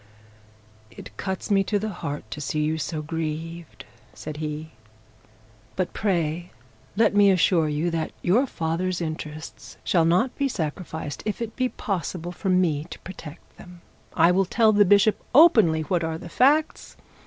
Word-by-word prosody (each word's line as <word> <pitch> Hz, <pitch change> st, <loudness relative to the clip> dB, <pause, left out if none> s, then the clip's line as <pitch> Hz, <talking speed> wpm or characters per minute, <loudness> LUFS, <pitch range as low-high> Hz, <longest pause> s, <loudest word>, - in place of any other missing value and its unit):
'It 105 Hz, -, -12 dB
cuts 190 Hz, -, -4 dB
me 195 Hz, -1 st, +4 dB
to 205 Hz, +2 st, 0 dB
the 215 Hz, +2 st, -3 dB
heart 145 Hz, -7 st, -5 dB
to 150 Hz, -, -5 dB
see 150 Hz, +2 st, -2 dB
you 155 Hz, +1 st, 0 dB
so 155 Hz, 0 st, -3 dB
grieved,' 160 Hz, +1 st, -5 dB, 0.3 s
said 155 Hz, -1 st, -7 dB
he. 155 Hz, +1 st, -5 dB, 1.0 s
'But 185 Hz, -1 st, -2 dB
pray 175 Hz, -3 st, -1 dB, 0.5 s
let 225 Hz, -, +4 dB
me 205 Hz, -1 st, +6 dB
assure 175 Hz, -4 st, +3 dB
you 155 Hz, +4 st, -1 dB
that 165 Hz, -1 st, -2 dB
your 235 Hz, +10 st, +3 dB
father's 175 Hz, 0 st, -2 dB
interests 155 Hz, -2 st, -7 dB
shall 170 Hz, -3 st, +2 dB
not 185 Hz, +10 st, +2 dB
be 280 Hz, -, +2 dB
sacrificed 160 Hz, -, -4 dB
if 215 Hz, -, -3 dB
it 230 Hz, -1 st, -5 dB
be 255 Hz, -1 st, 0 dB
possible 175 Hz, -4 st, -4 dB
for 190 Hz, +2 st, -4 dB
me 170 Hz, -5 st, +2 dB
to 170 Hz, -, -9 dB
protect 165 Hz, -4 st, -11 dB
them. 175 Hz, -1 st, -13 dB, 0.3 s
I 170 Hz, +2 st, +5 dB
will 190 Hz, +2 st, +2 dB
tell 220 Hz, +3 st, +3 dB
the 205 Hz, 0 st, +5 dB
bishop 205 Hz, +3 st, +4 dB
openly 215 Hz, -, +6 dB
what 170 Hz, +2 st, -1 dB
are 160 Hz, 0 st, -2 dB
the 170 Hz, -, -10 dB
facts. 295 Hz, -, +1 dB
175 Hz, 160 wpm, -24 LUFS, 160-200 Hz, 1.0 s, me